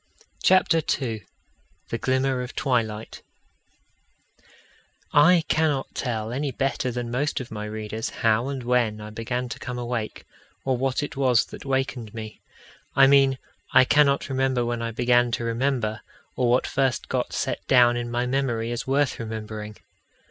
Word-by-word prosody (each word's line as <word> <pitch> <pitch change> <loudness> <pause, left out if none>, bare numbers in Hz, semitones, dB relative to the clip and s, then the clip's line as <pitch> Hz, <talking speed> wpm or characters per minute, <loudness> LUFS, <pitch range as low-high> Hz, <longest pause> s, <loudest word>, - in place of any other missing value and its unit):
CHAPTER 185 -3 +4 0.2
II 110 -8 -4 0.6
The 115 - -3
Glimmer 130 0 +1
of 125 +1 -7
Twilight 115 -4 -1 1.9
I 165 +3 +6
cannot 155 -4 0
tell 110 -3 -3
any 140 +3 -2
better 130 0 -1
than 120 -1 -4
most 145 +5 -1
of 130 - -8
my 105 -1 -5
readers 110 +1 -4
how 115 +2 +1
and 135 -2 -4
when 120 -3 +1
I 105 0 -8
began 120 +3 -3
to - - -6
come 125 0 -5
awake, 120 -2 -4 0.4
or 130 -1 +2
what 130 +3 0
it 145 - -5
was 130 -3 +3
that - - -11
wakened 130 -5 -2
me. 110 -1 -8 0.5
I 135 0 +7
mean, 135 -1 +5 0.4
I 130 - +7
cannot 140 0 +3
remember 130 -2 0
when 120 0 -2
I 115 - -2
began 120 +1 +3
to 120 - -1
remember, 115 -2 -1 0.3
or 125 -1 +1
what 125 +2 +3
first 135 -3 0
got - - -2
set - - -2
down 120 -2 +5
in 120 0 -3
my 120 +1 -1
memory 125 -3 -1
as 120 +2 -4
worth 140 0 +1
remembering. 110 -1 -6
125 Hz, 155 wpm, -25 LUFS, 115-135 Hz, 1.9 s, I